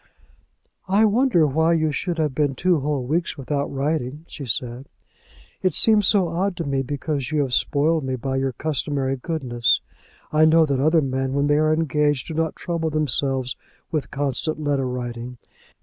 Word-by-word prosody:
"I 200 +4 +4
wonder 220 -6 +3
why 160 +4 +2
you 155 -2 +1
should 175 +3 -2
have 155 -4 0
been 145 -1 0
two 180 +4 +2
whole 140 -1 -1
weeks 160 +4 -1
without 140 +1 -2
writing," 145 +1 -2
she 140 - -8
said. 120 +3 -3 0.7
"It 185 -4 +1
seems 215 -3 +4
so 190 -5 +3
odd 180 +2 -1
to 170 - -2
me, 140 -2 -1
because 140 +1 -3
you 155 -1 +2
have 135 -3 -2
spoiled 155 +4 +2
me 130 -1 -2
by 130 +2 -3
your 135 0 0
customary 140 -1 -1
goodness. 125 -5 0 0.5
I 155 +1 +5
know 160 +1 +5
that 140 -3 -1
other 160 +4 +4
men 135 -1 -2
when 140 +1 +1
they 145 +1 +3
are 155 0 +3
engaged 150 -3 +1
do - - -4
not 160 0 -1
trouble 170 -2 -2
themselves 135 -3 0 0.4
with 155 -3 -2
constant 145 +3 -2
letter 145 -3 0
writing. 125 0 -5
145 Hz, 175 wpm, -23 LUFS, 135-160 Hz, 0.7 s, I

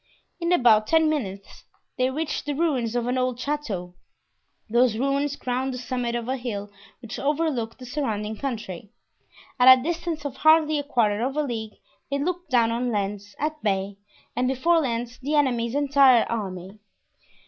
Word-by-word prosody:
In 340 0 -1
about 225 -9 +5
ten 320 -1 +4
minutes 200 -9 -5 0.3
they 255 0 +1
reached 300 +2 -3
the 290 - -1
ruins 265 -8 0
of 240 -1 0
an 250 +1 0
old 255 -1 -1
chateau; 235 -12 -3 0.7
those 235 0 +3
ruins 275 +2 0
crowned 255 0 -2
the - - -5
summit 245 -1 -3
of 235 -1 -3
a 260 +1 -1
hill 210 -5 -5 0.3
which 230 - -6
overlooked 280 -6 -1
the 255 - -10
surrounding 220 -6 -3
country. 215 -7 -5 0.7
At 260 +1 +9
a 250 - -5
distance 330 -1 -3
of 285 - -5
hardly 310 -1 +4
a - - -3
quarter 225 -7 +1
of 270 +4 -2
a 300 - +2
league 225 -5 -5 0.3
they 280 - 0
looked 350 +3 -3
down 235 -4 +3
on 245 +2 -1
Lens, 205 -1 -3
at 305 +1 -3
bay, 195 -1 -1 0.4
and 250 +1 +1
before 300 +6 +2
Lens 240 -2 -3
the 290 +4 -1
enemy's 245 -4 +1
entire 275 -4 +5
army. 195 -2 -5
250 Hz, 170 wpm, -25 LUFS, 225-290 Hz, 0.7 s, At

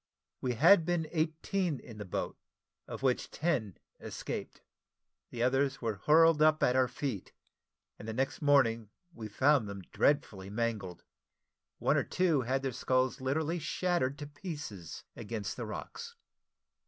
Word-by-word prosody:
We 125 -2 -1
had 170 - +7
been 170 -1 0
eighteen 160 0 -1
in 110 -2 -11
the 105 - -5
boat, 90 - -3 0.5
of - - -7
which 130 -2 +1
ten 130 - -1 0.2
escaped: - - -6 0.7
the 120 -1 -2
others 135 +2 +2
were 110 -4 -2
hurled 160 0 +6
up 155 0 +4
at 125 - +3
our 130 -1 +4
feet; 125 -4 -4 0.7
and 105 - -9
the 110 - -3
next 135 +3 -1
morning 115 -7 +3 0.2
we 110 -6 -7
found 130 +1 +3
them 100 -1 -7
dreadfully 110 -10 +1
mangled. 105 -5 -3 0.7
One - - +2
or - - +2
two 170 -7 +2
had 130 +2 -1
their 135 - -1
skulls 130 +1 0
literally 155 +6 0
shattered 155 -4 0
to 145 - -6
pieces 145 - -7
against 105 -2 -4
the 120 -3 -5
rocks. 470 - -7
130 Hz, 145 wpm, -32 LUFS, 115-155 Hz, 0.7 s, had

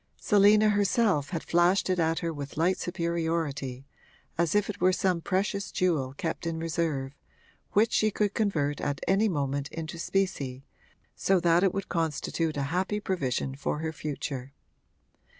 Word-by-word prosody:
Selina 210 +1 +5
herself 205 - +2
had 165 -4 -3
flashed 175 +3 +3
it 185 -1 +1
at 165 0 +2
her 165 - -1
with 145 -1 -7
light 175 +4 +2
superiority, 165 -7 -2 0.5
as 170 +2 +1
if 205 -1 +3
it 210 - -6
were 185 +1 +5
some 185 -2 +1
precious 200 +2 -1
jewel 155 -8 0
kept 165 +2 -3
in 165 -1 -2
reserve, 160 -5 -2 0.6
which 220 +3 +4
she 215 - +3
could 205 -1 0
convert 150 -10 0
at 145 -1 -2
any 205 +3 +3
moment 140 -4 -1
into 165 +1 -6
specie, 140 -9 -2 0.5
so 195 -1 +2
that 170 0 +4
it 195 - +4
would 195 +1 -4
constitute 160 -1 -1
a 140 - 0
happy 190 +3 0
provision 135 -9 -1
for 140 +2 -2
her 160 +1 -3
future. 140 -3 -5
170 Hz, 155 wpm, -28 LUFS, 145-195 Hz, 0.6 s, Selina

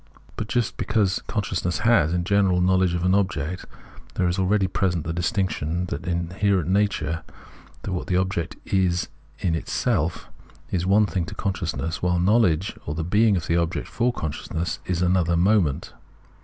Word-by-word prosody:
But - - -4
just 120 -1 -1
because 105 -3 +1
consciousness 90 -4 -1
has, 115 -9 +4
in 90 0 0
general, 95 -1 +2
knowledge 95 -1 +3
of 85 - -2
an 95 - +3
object, 90 -4 -1 0.5
there 90 - +1
is 90 +2 0
already 95 +1 +2
present 90 -3 0
the 80 - -2
distinction 90 -2 -1
that 70 - -3
the 90 - -5
inherent 90 +2 0
nature, 95 -5 0 0.6
what 95 -3 -3
the 90 - +1
object 95 -3 -1
is 90 -2 +1 0.3
in 90 -3 0
itself, 80 - -1 0.4
is 90 -1 0
one 105 +2 +5
thing 95 -3 -2
to 80 - -8
consciousness, 90 -4 -3
while 90 0 +1
knowledge, 95 -2 +2
or 75 - -2
the 80 - -2
being 105 +4 +3
of 80 - -3
the 85 +2 +1
object 85 +1 -1
for 125 +1 0
con 80 -10 -3
sciousness, 80 +2 -4
is 90 -1 0
another 90 -2 +2
moment. 90 -6 +2
90 Hz, 170 wpm, -24 LUFS, 85-100 Hz, 0.6 s, one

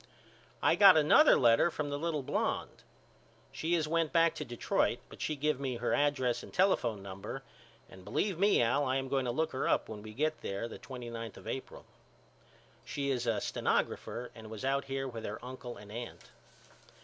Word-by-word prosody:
I - - +5
got 195 -4 +8
another 155 - +6
letter 120 +6 +5
from 150 -3 -4
the 145 - -2
little 155 -3 -1
blonde. - - -2 0.7
She 165 +2 0
has 160 -2 0
went 165 -1 +1
back 165 -1 +4
to - - -5
Detroit 120 -4 0
but - - -12
she 155 - -1
give 150 0 0
me 135 -3 -2
her 120 +1 -1
address 130 -5 +1
and - - -11
telephone 120 - +1
number 95 0 -7 0.4
and 95 - -14
believe 190 - -1
me 200 -9 +4
Al 130 +5 +2
I 130 - +1
am 135 0 -2
going 135 -1 0
to 120 - 0
look 160 +6 -1
her 130 - -1
up - - +2
when 105 -1 -7
we 110 0 -10
get 155 +2 -1
there 100 +4 -3
the - - -9
twenty 125 -3 -8
ninth 115 -2 -6
of - - -12
April. - - -6 1.0
She 140 -1 -2
is 125 -2 -1
a 115 -2 +1
stenographer 120 +1 -1
and 110 -2 -11
was 110 +3 -6
out 140 +1 +1
here 135 0 -3
with 115 -3 -7
her 105 - -4
uncle 125 -1 -7
and 105 0 -12
aunt. 120 +2 -8
130 Hz, 195 wpm, -32 LUFS, 115-150 Hz, 1.0 s, got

